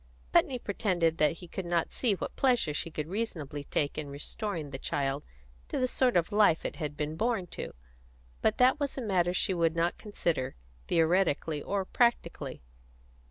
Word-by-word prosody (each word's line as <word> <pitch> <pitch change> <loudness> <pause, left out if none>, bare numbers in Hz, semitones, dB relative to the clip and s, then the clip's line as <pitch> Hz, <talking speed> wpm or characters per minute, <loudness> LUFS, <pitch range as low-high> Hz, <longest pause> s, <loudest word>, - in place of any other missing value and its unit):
Putney 255 - +4
pretended 180 -7 0
that 150 0 +4
he 175 +2 -11
could 190 - -4
not 170 -1 +1
see 235 -5 +2
what - - -5
pleasure 245 - +2
she 165 - -2
could 155 -2 -3
reasonably 160 -8 -3
take 145 +2 -1
in 145 -2 -5
restoring 155 +2 -4
the 135 - -5
child 140 +1 -1 0.4
to - - -3
the 255 - +2
sort 250 -4 +2
of 170 +4 +1
life 205 -6 +4
it - - -3
had 150 -3 -4
been 150 +1 -2
born 225 0 0
to; - - -6 0.7
but - - +2
that 255 +3 +5
was 285 -1 -2
a - - -2
matter 180 -5 +2
she 185 +1 +1
would 165 -2 +2
not 170 +1 +1
consider, 170 - -1 0.3
theoretically 165 -3 +2
or 195 +3 -1
practically. 170 - 0
170 Hz, 175 wpm, -30 LUFS, 150-210 Hz, 0.7 s, that